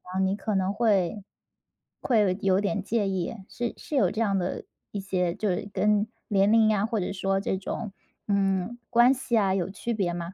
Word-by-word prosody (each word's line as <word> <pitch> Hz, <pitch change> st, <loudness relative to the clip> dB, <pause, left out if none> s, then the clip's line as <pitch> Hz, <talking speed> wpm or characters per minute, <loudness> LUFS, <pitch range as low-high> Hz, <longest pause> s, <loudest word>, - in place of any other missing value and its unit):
啊， 185 Hz, +1 st, -4 dB
你 190 Hz, 0 st, +2 dB
可 210 Hz, +1 st, -3 dB
能 190 Hz, +1 st, +1 dB
会 205 Hz, -3 st, +1 dB, 0.8 s
会 240 Hz, -4 st, +2 dB
有 200 Hz, -, +3 dB, 0.3 s
有 -, -, +3 dB
点 205 Hz, 0 st, -1 dB
介 210 Hz, 0 st, 0 dB
意， 190 Hz, +2 st, -2 dB
是 240 Hz, -1 st, -3 dB
是 300 Hz, -, -6 dB
有 200 Hz, -10 st, +4 dB
这 220 Hz, -, -2 dB
样 200 Hz, -3 st, +2 dB
的 180 Hz, 0 st, -3 dB, 0.3 s
一 205 Hz, -, -4 dB
些 185 Hz, -3 st, -1 dB
就 210 Hz, 0 st, -1 dB
是 185 Hz, +2 st, -2 dB
跟 210 Hz, +2 st, +2 dB, 0.2 s
年 200 Hz, -1 st, +3 dB
龄 225 Hz, -1 st, +5 dB
呀， 210 Hz, -1 st, +2 dB
或 225 Hz, 0 st, -1 dB
者 180 Hz, -, -2 dB
说 195 Hz, 0 st, 0 dB
这 195 Hz, -1 st, -1 dB
种， 200 Hz, +2 st, -5 dB, 0.4 s
嗯， 195 Hz, +2 st, 0 dB
关 240 Hz, +1 st, +6 dB
系 250 Hz, -3 st, -1 dB
啊， 195 Hz, -3 st, +3 dB
有 190 Hz, -2 st, -1 dB
区 220 Hz, +5 st, -4 dB
别 190 Hz, -5 st, -1 dB
吗？ 170 Hz, +1 st, -5 dB
200 Hz, 220 characters per minute, -27 LUFS, 190-220 Hz, 0.8 s, 关